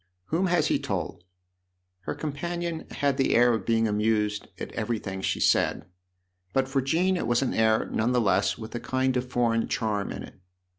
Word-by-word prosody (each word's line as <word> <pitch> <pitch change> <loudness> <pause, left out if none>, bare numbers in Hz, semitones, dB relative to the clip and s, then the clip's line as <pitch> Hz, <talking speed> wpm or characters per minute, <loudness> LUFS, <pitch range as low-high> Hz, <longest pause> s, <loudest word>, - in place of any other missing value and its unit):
" 90 - -49
Whom 185 +4 +2
has 175 -3 +2
he - - +1
told 85 - -4 0.4
?" 90 0 -51
Her - - -2
companion 170 +2 -4
had 140 -2 0
the 135 - +2
air 120 0 +5
of 110 -4 -3
being 115 -1 +3
amused 105 0 0
at - - -5
everything 100 -5 -3
she - - -1
said; - - +2 0.7
but 135 0 +2
for 135 0 0
Jean 175 +8 +2
it - - -2
was 120 +2 +2
an 130 - -1
air, 110 0 +3
none 115 +3 0
the 125 - +3
less, 100 -2 +2
with 110 -1 -8
a 120 - -3
kind 130 +1 0
of 125 0 -1
foreign 115 -2 +1
charm 105 -3 -1
in - - -6
it. - - -13
120 Hz, 200 wpm, -27 LUFS, 105-135 Hz, 0.7 s, air